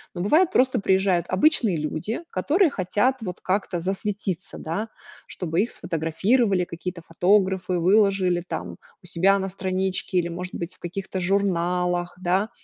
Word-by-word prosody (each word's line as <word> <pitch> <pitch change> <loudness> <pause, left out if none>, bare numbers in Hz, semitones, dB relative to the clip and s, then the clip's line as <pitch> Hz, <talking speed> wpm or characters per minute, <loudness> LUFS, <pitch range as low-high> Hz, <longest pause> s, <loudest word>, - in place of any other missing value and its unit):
но 175 - -3
бывает, 320 - +3
просто 255 -5 +3
приезжают 190 -2 +2
обычные 215 - +3
люди, 155 - -3
которые 310 - +2
хотят 205 +6 +1
вот 185 -4 -6
как-то 185 -2 -1
засветиться, 195 0 -3
да, 200 +8 -4 0.4
чтобы 170 -1 -1
их 235 - -2
сфотографировали, 180 +5 +1
какие-то 170 +1 -6
фотографы 185 +2 +1
выложили 190 -1 +3
там 90 - -5 0.3
у - - -16
себя 185 +3 +3
на 190 0 -3
страничке 190 0 -2
или, 170 - -1
может 180 +2 -6
быть, 170 +1 -5
в - - -27
каких-то 190 +2 -5
журналах, 180 -2 0
да. 190 +4 +1
185 Hz, 145 wpm, -24 LUFS, 175-200 Hz, 0.4 s, бывает